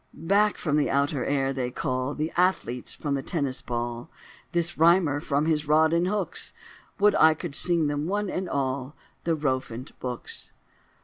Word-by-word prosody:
Back 200 +5 +2
from 150 -3 0
the 150 - +2
outer 140 -1 +1
air 135 -1 0
they 130 -2 -2
call 130 +2 -2
The 155 +2 -2
athletes 175 -9 0
from 145 -2 -3
the 135 - -1
Tennis 140 -3 -2
ball, 120 +3 -4 0.4
This 170 0 0
Rhymer 165 -2 +4
from 145 -1 0
his 155 -2 0
rod 155 +2 +4
and 170 +2 +2
hooks, 190 -4 -1 0.4
Would 205 0 +4
I 160 0 +5
could 165 -1 -6
sing 170 +2 +3
them, 145 +1 -1
one 205 +2 -1
and 185 0 -3
all, 135 +1 -2 0.3
The 165 -1 +2
Rowfant 130 -4 -2
books!" 125 -2 -6
150 Hz, 170 wpm, -26 LUFS, 135-170 Hz, 0.4 s, I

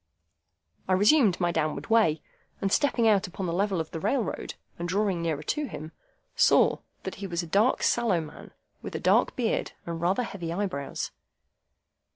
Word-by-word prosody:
I 185 - +2
resumed 205 - +4
my 175 -1 +1
downward 155 -2 -1
way, 210 -9 +3 0.4
and 195 - -1
stepping 240 -4 +2
out 205 -1 +3
upon 185 +1 -5
the 170 - -2
level 195 0 0
of 160 -1 -4
the 165 - -4
railroad, 215 - -2 0.2
and 175 +1 -3
drawing 195 -2 0
nearer 160 -3 -2
to 300 - -1
him, 155 - -8 0.4
saw - - +4 0.2
that - - -4
he 195 - -3
was 170 -1 -2
a - - -5
dark, 205 +9 +2
sallow 230 -7 +2
man, 155 -2 -9 0.3
with - - -7
a - - -2
dark - - +3
beard - - -1
and 165 -1 -5
rather 185 +8 +1
heavy 175 -7 -5
eyebrows. 175 -7 -3
185 Hz, 175 wpm, -27 LUFS, 170-210 Hz, 0.4 s, resumed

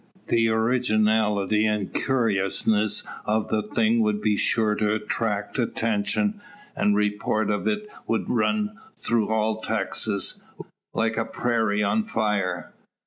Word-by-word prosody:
The 115 -1 +3
originality 110 -3 +2
an' 105 -2 -1
curiousness 110 -3 +1 0.2
o' 110 +1 +2
the 110 +1 -1
thing 110 +2 +1
would 105 -1 +1
be 105 0 +1
sure 110 +1 +2
to 105 0 +1
'tract 105 0 -2
attention, 115 - 0 0.3
an' 105 - +2
the - - +1
report 105 0 0
o't 105 -1 -1 0.4
would 115 - 0
run 105 -2 0 0.2
through 115 -3 0
all 110 0 0
Texas, 105 -1 -1 0.5
like 115 0 0
a 115 - +1
prairie 110 -4 0
on 215 - +1
fire. 105 - -1
110 Hz, 125 wpm, -25 LUFS, 105-115 Hz, 0.5 s, The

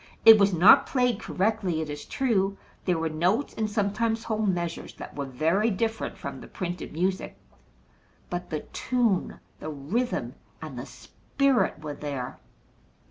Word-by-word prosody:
It 225 -1 +11
was 200 0 +4
not 180 +3 +7
played 250 -5 +1
correctly, 195 -5 0
it 160 - -2
is 145 0 -6
true. 200 -7 0 0.3
There 180 -3 +2
were 160 0 0
notes, 180 - 0
and 215 -1 -1
sometimes 220 +2 0
whole 220 -1 -1
measures, 175 -3 -2
that - - -9
were 140 -1 -3
very 165 - +1
different 225 +2 -2
from 140 -1 -6
the - - -10
printed 180 -1 -5
music. 185 +4 -2 0.9
But 175 0 -5
the 155 -2 -2
tune, 235 -7 0 0.2
the 155 - -5
rhythm, 165 - -2 0.3
and - - -7
the - - -6
spirit 270 - -1
were 150 -1 -4
there. 140 -3 -5
190 Hz, 150 wpm, -27 LUFS, 160-220 Hz, 0.9 s, It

